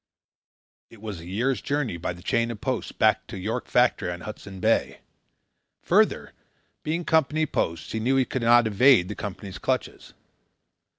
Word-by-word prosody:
It 115 - -16
was 105 -4 -6
a 85 - -11
year's 120 +8 -1
journey, 140 -8 -2
by 85 +1 -3
the 85 0 -14
chain 115 0 +1
of 115 -3 -6
posts, 130 0 -3
back 110 0 +2
to - - -7
York 110 +6 -3
Factory 125 -6 +2
on 85 0 -7
Hudson's 100 -2 -9
Bay. - - +1 0.8
Further, - - +2 0.5
being 165 +3 -2
Company 155 0 +2
posts, 85 - -3
he 110 - -2
knew 125 +5 +1
he 130 -1 +3
could 130 - -3
not 120 +1 +5
evade 110 -2 +4
the 105 - -5
Company's 100 -1 -7
clutches. - - -3
110 Hz, 165 wpm, -25 LUFS, 100-130 Hz, 0.8 s, not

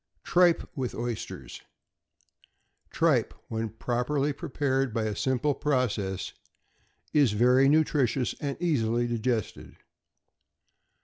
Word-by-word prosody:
=Tripe 175 -1 +3
with 130 -4 -3
Oysters.= 115 - -5 1.3
Tripe, - - +1
when 110 0 -2
properly 125 +6 -1
prepared 135 -5 -1
by 115 - 0
a 110 -1 -2
simple 130 +5 0
process, 110 -10 -1 0.8
is 140 -8 +4
very 125 +5 +4
nutritious 140 -5 +2
and 140 0 -4
easily 120 -9 +1
digested. 120 -1 -2
125 Hz, 90 wpm, -28 LUFS, 115-145 Hz, 1.3 s, is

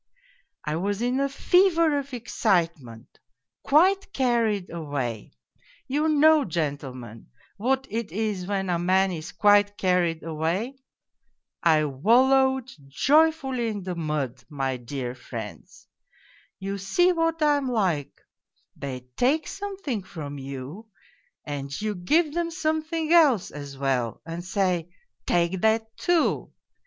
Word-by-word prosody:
I 150 +1 -1
was 200 +5 -2
in 250 +2 +1
a 275 0 +1
fever 335 0 +3
of 280 0 -8
excitement, 170 - -2 0.4
quite 380 +7 +3
carried 230 -7 +1
away 140 -9 -4 0.6
you 300 +4 +1
know, 310 0 +5
gentlemen, 140 - -4 0.3
what 265 +5 0
it 225 -6 -4
is 200 -2 -2
when 195 -2 -1
a 170 - 0
man 190 +2 +2
is 160 -1 -6
quite 205 +1 +4
carried 180 -3 +1
away? 170 - -2 0.8
I 155 -2 +4
wallowed 260 - +3 0.2
jo}^fully 275 - +2
in 205 -3 -5
the 185 0 -3
mud, 150 -7 -3
my 135 -3 -2
dear 125 0 -5
friends. 130 - -9 0.7
You 195 +1 -4
see 350 - +3
what 330 -1 0
I 295 -1 +4
am 275 -2 -2
like; 180 - -1 0.6
they 130 -2 -6
take 295 +5 +1
something 390 - -4
from 145 -6 -8
you, 135 - -8 0.6
and 140 -2 -5
you 215 0 -2
give 295 - +1
them 340 0 -1
something 315 -1 -1
else 290 - +5
as 145 -2 -8
well 130 -4 -1
and 165 +1 -6
say, 180 -3 0 0.2
' 120 - -52
Take 175 +1 +1
that, 220 0 +1
too.' 350 -2 +1
200 Hz, 125 wpm, -25 LUFS, -, 0.8 s, know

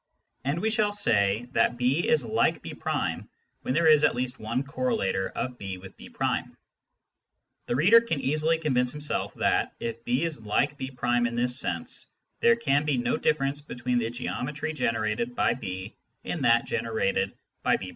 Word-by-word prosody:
And 140 +5 0
we 220 - +2
shall 210 -1 +1
say 115 - +1
that 120 - +2
B 130 +7 +1
is 150 -6 +3
like - - +1
B' - - -6 0.9
when 130 - -2
there 170 - +3
is 155 -1 +6
at - - +4
least 125 +1 -3
one 115 +5 -1
correlator 160 - -1
of 125 -1 -4
B 95 -2 -5
with 95 +1 -12
B'. - - -12 1.6
The - - 0
reader 200 - +7
can 165 -11 -2
easily 155 +4 +1
convince 125 -6 +1
himself 150 0 -3
that, - - +1
if 115 0 -4
B 125 +5 +1
is 155 -9 -3
like 140 +7 +1
B' 135 -1 -5
in 120 -1 +1
this 125 +2 +1
sense, 85 -9 -3 0.3
there 235 0 +5
can 145 -11 +1
be 150 -3 +1
no 120 - +1
difference 140 -1 0
between 125 -3 -1
the 115 -1 -1
geometry 140 +5 -3
generated 115 -3 -1
by - - +3
B 95 -3 -6 0.3
and 150 -7 -2
that 115 0 +5
generated 100 -4 0 0.3
by - - +3
B'. - - -7
125 Hz, 170 wpm, -27 LUFS, 115-150 Hz, 1.6 s, reader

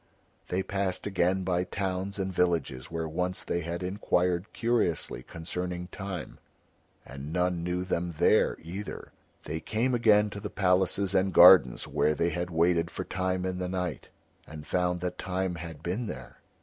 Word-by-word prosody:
They 95 +1 -1
passed 100 -2 -2
again 95 -1 +1
by 90 -1 +1
towns 95 +1 -3
and 95 -1 -2
villages 85 -8 0
where 80 -1 -3
once 90 +3 -2
they 85 - -1
had 85 +1 -4
inquired 90 -1 0
curiously 115 -9 0
concerning 90 +2 -5
Time, 95 -6 -6 0.7
and 70 +3 -8
none 90 0 0
knew 90 +1 -1
them 85 -2 -2
there - - +3
either. 95 +5 -7 0.3
They 80 +2 -4
came 115 +9 -1
again 105 -3 +4
to 100 - -6
the 105 0 -5
palaces 95 0 +2
and 95 0 +2
gardens 85 -8 +7
where 75 - +1
they 85 +2 +1
had 90 +2 -3
waited 85 0 +2
for - - -5
Time 95 0 -2
in 90 0 -2
the 90 -1 -2
night, 90 -4 -3 0.4
and 75 -1 -9
found 90 +1 0
that 90 0 -4
Time 95 -1 -2
had 85 -3 -8
been 105 +7 -2
there. 65 -9 -8
90 Hz, 160 wpm, -29 LUFS, 85-95 Hz, 0.7 s, gardens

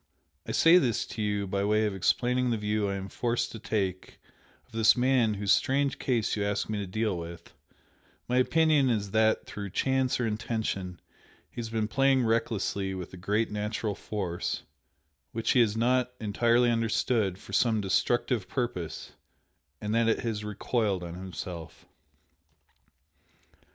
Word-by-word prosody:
I - - -2
say 170 +2 +6
this 120 -9 0
to 110 - -6
you 105 -1 0
by 100 +1 -1
way 105 +1 +2
of 105 - -1
explaining 125 +6 +1
the 115 - +1
view 105 -1 0
I 100 - -2
am 95 0 -5
forced 120 +3 -1
to 115 - -8
take 95 -4 -3 0.5
of - - -30
this 110 0 +4
man 125 -4 +3
whose 100 -1 +2
strange 140 +1 +1
case 120 -5 0
you 105 - -1
ask 100 0 -1
me 110 -1 -2
to 100 - -4
deal 110 +1 -1
with, 85 0 -8 0.7
my 125 - +1
opinion 150 0 +3
is 105 -4 -1
that 110 +1 +2
through 100 -1 -6
chance 130 +5 +1
or 120 - +1
intention 105 -5 -3 0.5
he - - -5
has 115 - -5
been 110 -1 -1
playing 135 +1 +3
recklessly 100 -4 0
with 90 -1 -7
a - - -7
great 105 +5 -1
natural 105 0 -2
force, 95 -4 -4 0.7
which 115 0 0
he 130 - +4
has 110 -2 +3
not 125 +2 +2
entirely 120 +3 +2
understood, 115 -3 +1
for 100 - -13
some 110 +1 +3
destructive 105 +2 +1
purpose, 120 - -3 0.7
and 105 +1 -3
that 115 0 +3
it 110 - +1
has 110 -3 -3
recoiled 105 -2 -1
on 85 -1 -6
himself." 85 -2 -8
110 Hz, 160 wpm, -28 LUFS, 100-120 Hz, 0.7 s, say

